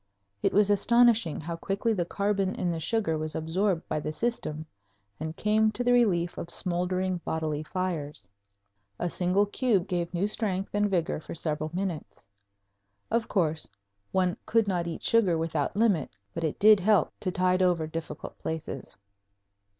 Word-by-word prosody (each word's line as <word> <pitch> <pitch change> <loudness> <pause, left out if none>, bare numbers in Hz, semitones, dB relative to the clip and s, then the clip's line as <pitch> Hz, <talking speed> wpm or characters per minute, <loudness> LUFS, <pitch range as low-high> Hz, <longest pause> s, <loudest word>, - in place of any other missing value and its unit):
It - - +2
was 205 0 +4
astonishing 230 -3 +4
how 170 +2 -4
quickly 200 +6 -1
the 180 -5 -1
carbon 200 +1 0
in 175 - -1
the 165 - -3
sugar 160 -2 0
was 155 0 -4
absorbed 170 +3 0
by 155 - -1
the 150 - -3
system 155 -6 -2 0.5
and 160 +1 -4
came 215 +1 +3
to 245 - -2
the 245 0 +3
relief 180 -8 +2
of 170 - -6
smoldering 180 +1 -1
bodily 155 -2 -2
fires. 155 - -4 0.7
A 175 -1 -2
single 185 +3 +2
cube 205 -3 +1
gave 175 -2 -2
new 180 +2 0
strength 200 -3 -1
and 205 0 +2
vigor 170 -5 0
for 155 - -8
several 155 -1 -2
minutes. 180 - -4 0.9
Of 230 0 +1
course, 160 -5 +1 0.4
one 185 -2 +1
could 225 -2 +3
not 175 -3 0
eat 165 - -5
sugar 200 -8 +3
without 160 0 -1
limit, 205 - +2 0.2
but 165 - -4
it 155 - -1
did 215 0 +7
help 205 +1 +3
to 185 - -1
tide 185 0 +2
over 175 -3 +2
difficult 160 +1 -7
places. 160 -4 -5
180 Hz, 160 wpm, -28 LUFS, 160-205 Hz, 0.9 s, did